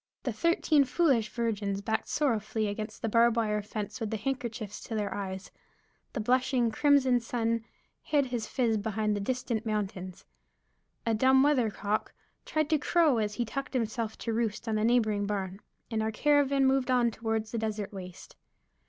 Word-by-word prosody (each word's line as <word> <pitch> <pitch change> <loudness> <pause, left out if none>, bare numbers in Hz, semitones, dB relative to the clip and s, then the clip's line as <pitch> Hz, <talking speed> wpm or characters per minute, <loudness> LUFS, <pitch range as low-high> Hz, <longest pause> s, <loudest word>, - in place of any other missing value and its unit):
The - - -2
thirteen 335 -3 +3
foolish 260 - +2
virgins 205 -3 -2
backed 220 +2 -2
sorrowfully 220 -6 0
against 215 +1 -5
the - - +1
barbed 235 +1 +4
wire 210 -2 +1
fence 210 +1 -5
with 225 -3 -3
handkerchiefs 225 -2 -4
to 225 - -4
their 210 -1 -1
eyes; 190 -1 -5 0.6
the 265 - -3
blushing, 250 +1 +2
crimson 265 -1 +4
sun 230 -1 -1 0.4
hid 290 -2 +1
his 240 -4 -3
phiz 230 -4 +1
behind 215 0 0
the - - -2
distant 235 0 -2
mountains; 200 -4 -4 0.8
a 230 - +2
dumb 265 +4 +5
weathercock 220 -7 0 0.3
tried 310 0 0
to 310 - +4
crow 310 -5 +3
as 210 -1 -1
he 240 - -1
tucked 275 +4 -5
himself 225 -2 -2
to 230 - -3
roost 225 0 -2
on 215 -1 0
a - - 0
neighboring 215 -4 +2
barn; 195 -2 -3 0.3
and 220 -1 0
our 220 0 0
caravan 280 +2 +3
moved 265 -1 +2
on 245 -2 +3
toward 220 0 -2
the 225 +1 -4
desert 215 -2 -3
waste. 185 -2 -9
225 Hz, 165 wpm, -29 LUFS, 210-255 Hz, 0.8 s, dumb